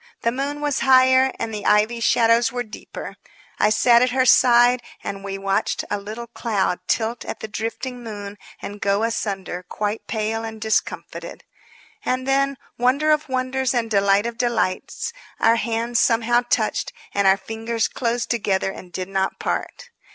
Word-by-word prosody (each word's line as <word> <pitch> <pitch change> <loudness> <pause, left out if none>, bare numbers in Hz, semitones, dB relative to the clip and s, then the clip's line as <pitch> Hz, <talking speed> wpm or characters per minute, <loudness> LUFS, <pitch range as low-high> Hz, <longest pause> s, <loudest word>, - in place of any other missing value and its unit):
The 230 - +2
moon 280 +3 -3
was 290 -2 0
higher 260 0 +5
and 225 -1 -4
the 210 -1 -5
ivy 215 +3 +3
shadows 230 0 +3
were 245 0 -2
deeper. 215 -2 -9 0.4
I 210 - +4
sat 235 +2 +5
at 250 - +3
her 255 +1 +2
side 245 0 +5 0.2
and 195 0 -5
we 195 -1 -4
watched 195 0 -1
a 205 - 0
little 215 +4 -7
cloud 225 -6 -1
tilt 225 +1 -1
at - - -6
the - - -4
drifting 230 +4 -5
moon 205 -2 -7 0.2
and 205 +1 -7
go 200 +2 +1
asunder 195 -5 -2
quite 210 +4 -4
pale 220 0 -2
and 225 -1 -6
discomfited. 220 0 -3 0.6
And 255 +1 -1
then, 275 0 +2 0.2
wonder 275 +5 +3
of 300 -1 +1
wonders 260 0 0
and 230 -2 -1
delight 200 0 +3
of 235 -1 -5
delights! 235 - -1 0.3
our 230 +1 +4
hands 230 +1 -1
somehow 235 +1 +3
touched, 215 -3 0 0.2
and 200 -1 +2
our 190 0 +6
fingers 225 +2 -2
closed 240 -1 -2
together 200 -5 0
and 180 -2 -11
did 185 0 -4
not 190 0 -1
part. 485 - -4
230 Hz, 165 wpm, -22 LUFS, 210-250 Hz, 0.6 s, our